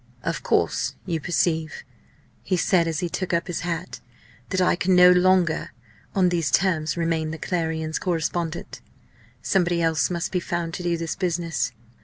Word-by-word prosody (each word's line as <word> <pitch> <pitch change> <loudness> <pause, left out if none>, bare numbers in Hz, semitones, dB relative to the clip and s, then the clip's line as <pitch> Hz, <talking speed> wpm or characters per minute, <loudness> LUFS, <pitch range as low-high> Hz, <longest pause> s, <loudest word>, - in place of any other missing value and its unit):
"Of - - -2
course, - - 0
you 170 -3 -1
perceive," 160 -1 -1 0.6
he 185 - -1
said, 175 -1 +2
as 165 +1 -2
he 175 - 0
took 185 +1 -3
up 170 - 0
his 175 -3 -3
hat, 175 0 -4 0.5
"that 185 - 0
I 180 - +3
can 185 0 +2
no 180 0 +8
longer 180 -2 +3 0.4
on 185 -2 +4
these 170 -5 0
terms 160 -1 +1
remain 165 -2 0
the 160 - -5
Clarion's 160 -2 -2
correspondent. 170 -1 -2 0.6
Somebody 175 -3 +2
else 165 -1 +2
must 175 -1 -2
be 180 - +1
found 170 -1 -3
to - - -4
do 170 -1 0
this 165 0 -3
business." 165 - -1
170 Hz, 165 wpm, -24 LUFS, 160-180 Hz, 0.6 s, no